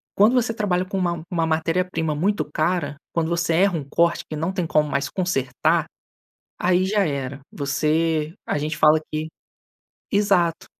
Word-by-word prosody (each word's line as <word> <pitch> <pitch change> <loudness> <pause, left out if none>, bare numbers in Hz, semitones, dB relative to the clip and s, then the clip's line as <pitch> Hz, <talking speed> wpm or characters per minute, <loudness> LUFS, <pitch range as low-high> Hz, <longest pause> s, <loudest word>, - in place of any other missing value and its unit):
quando 210 +5 +5
você 240 -2 +1
trabalha 185 -5 0
com 195 +1 -4
uma 170 -3 -1
uma 165 -2 +1
matéria-prima 165 0 0
muito 200 +7 0
cara, 155 -2 0 0.2
quando 165 -1 0
você 170 -1 0
erra 185 0 +3
um 150 - -4
corte, 170 +2 +2
que 155 - -4
não 165 +4 -1
tem 180 -4 -2
como 150 -1 +2
mais 140 0 -1
consertar, 175 -9 0 0.8
aí 180 +1 +3
já 205 +1 +2
era. 140 -2 -4
Você 155 +2 0
a - - 0
gente 150 +1 -3
fala 155 0 +5
que 155 +1 -2 0.8
Exato. 190 -5 +2
165 Hz, 160 wpm, -23 LUFS, 155-185 Hz, 0.8 s, quando